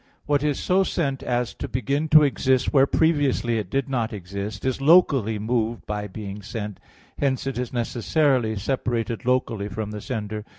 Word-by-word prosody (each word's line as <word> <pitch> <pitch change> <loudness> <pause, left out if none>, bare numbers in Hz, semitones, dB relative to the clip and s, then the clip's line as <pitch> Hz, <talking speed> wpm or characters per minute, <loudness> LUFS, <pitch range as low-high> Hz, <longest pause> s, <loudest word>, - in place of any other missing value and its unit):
2: - - -36 0.2
What 145 -2 +2
is 150 -2 0
so 190 +1 +2
sent 140 -8 -1
as 120 -1 -1
to - - -6
begin 140 +4 -1
to 155 0 +8
exist 130 -2 +1
where 135 -1 +5
previously 140 -8 +2
it 100 -4 -5
did 135 +3 -1
not 120 -4 -1
exist, 100 +2 -6
is 130 0 -1
locally 135 - +4
moved 115 +1 -1
by 105 0 -3
being 100 0 -7
sent; 105 -1 -6 0.4
hence 135 -2 0
it 135 -2 -3
is 125 -2 -3
necessarily 120 0 +1
separated 120 +1 -2
locally 120 -5 0
from 105 +1 -5
the 105 -1 -6
sender. 105 -3 -4
120 Hz, 175 wpm, -24 LUFS, 105-135 Hz, 0.4 s, to